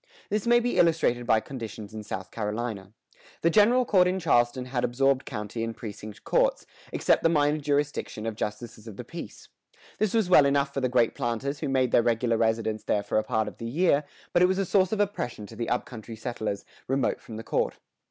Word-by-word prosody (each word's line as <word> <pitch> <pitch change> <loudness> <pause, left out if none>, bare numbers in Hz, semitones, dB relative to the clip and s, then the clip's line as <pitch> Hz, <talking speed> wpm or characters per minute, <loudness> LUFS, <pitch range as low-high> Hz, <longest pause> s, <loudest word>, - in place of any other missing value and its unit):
This 210 +2 -1
may 240 0 +6
be 245 +1 -1
illustrated 155 -8 +2
by 110 -2 +4
conditions 110 -5 -8
in 110 - -5
South 95 -3 -6
Carolina. 105 -2 -4 0.5
The 170 - +4
general 235 +6 +5
court 185 -5 +4
in 185 +1 0
Charleston 125 -6 +2
had 125 -1 -2
absorbed 135 +2 +2
county 110 -1 -4
and 115 0 -4
precinct 105 -1 -8
courts, - - +1 0.3
except - - +2
the 165 - +3
minor 150 -1 +2
jurisdiction 145 -6 -1
of 115 -1 -3
justices 110 +1 -5
of 105 - -9
the - - -6
peace. - - -9 0.5
This 215 0 +1
was 220 -5 +3
well 150 -6 +6
enough 140 0 +1
for 135 - -2
the 130 - +1
great 120 -2 +3
planters 125 +5 -2
who - - -2
made 130 -2 +2
their - - +5
regular 115 0 +1
residence 110 -1 0
there 105 - +1
for 105 - +1
a - - -2
part 110 0 0
of - - -9
each 115 0 -4
year; 165 -4 +3 0.3
but 175 - +4
it 180 - +7
was 190 0 0
a 195 - +1
source 190 0 +2
of 215 - -1
oppression 200 - -2
to 110 - -12
the 115 +1 -3
up 125 - 0
country 115 -2 -9
settlers, 110 -3 -4 0.2
remote 135 0 0
from 110 - -10
the 110 - -6
court. - - -1
120 Hz, 215 wpm, -27 LUFS, 110-165 Hz, 0.5 s, it